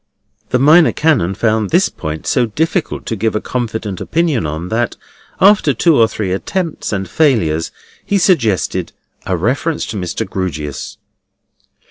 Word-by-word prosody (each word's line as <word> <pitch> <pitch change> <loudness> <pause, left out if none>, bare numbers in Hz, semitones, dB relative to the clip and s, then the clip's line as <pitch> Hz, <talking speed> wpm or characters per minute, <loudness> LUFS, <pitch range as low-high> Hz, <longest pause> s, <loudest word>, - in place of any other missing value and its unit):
The 125 - +2
Minor 155 +6 +6
Canon 125 - +1
found 110 -1 0
this - - +3
point 75 0 -6
so 125 -2 +2
difficult 160 - -2
to 115 - -2
give 110 +1 -1
a - - +1
confident 110 -6 -4
opinion 160 - 0
on, 80 +4 -5
that, 120 +2 -1 0.4
after 190 -8 +4
two 165 +6 +3
or 115 -4 +5
three 105 -4 -3
attempts 165 - -3
and 95 -3 -2
failures, 90 - +1 0.3
he 200 - 0
suggested 115 - +1 0.3
a 95 - 0
reference 135 - -1
to 110 - -5
Mr. 90 -3 -3
Grewgious. 75 -7 -4
110 Hz, 145 wpm, -16 LUFS, 95-155 Hz, 0.4 s, Minor